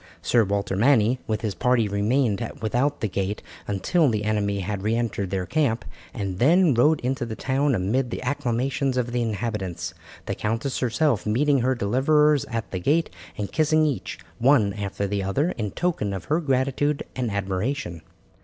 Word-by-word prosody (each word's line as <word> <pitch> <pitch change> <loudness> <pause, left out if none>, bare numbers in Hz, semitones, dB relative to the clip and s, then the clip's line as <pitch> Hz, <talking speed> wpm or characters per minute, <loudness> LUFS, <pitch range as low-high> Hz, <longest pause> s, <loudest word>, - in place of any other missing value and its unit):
Sir 120 -2 +4
Walter 100 -1 -1
Manny 120 +2 +3
with 110 -1 -1
his 110 -3 -2
party 115 +4 +2
remained 105 +2 +1 0.2
without 125 +7 0
the 110 - +1
gate 100 +1 -3 0.2
until 115 - +2
the 105 -2 -1
enemy 100 -2 0
had 100 +1 -3
re 110 +3 0
entered 110 -5 -2
their 95 -1 -2
camp, 135 - 0 0.3
and 100 -5 -4
then 165 +4 +5
rode 145 +6 +4
into 130 +2 -1
the 115 -2 -4
town 135 +3 +1
amid 115 +7 0
the - - -5
acclamations 130 0 -1
of 120 -1 -1
the 120 0 0
inhabitants, 100 -7 -3 0.3
the - - -2
countess 115 +5 -2
herself 125 -2 +1
meeting 140 +6 +3
her 130 +2 +1
deliverers 140 +6 +3
at 115 -3 -4
the 95 - -2
gate 155 - +1 0.3
and 100 -2 -4
kissing 155 0 +3
each, 145 -4 -2 0.2
one 120 -6 +4
after 100 -1 -3
the 100 0 -1
other, 135 - 0
in 110 - -3
token 155 - -1
of 95 - -7
her 155 +3 +1
gratitude 140 0 0
and 125 -3 -1
admiration. 100 - -2
115 Hz, 170 wpm, -24 LUFS, 100-140 Hz, 0.3 s, then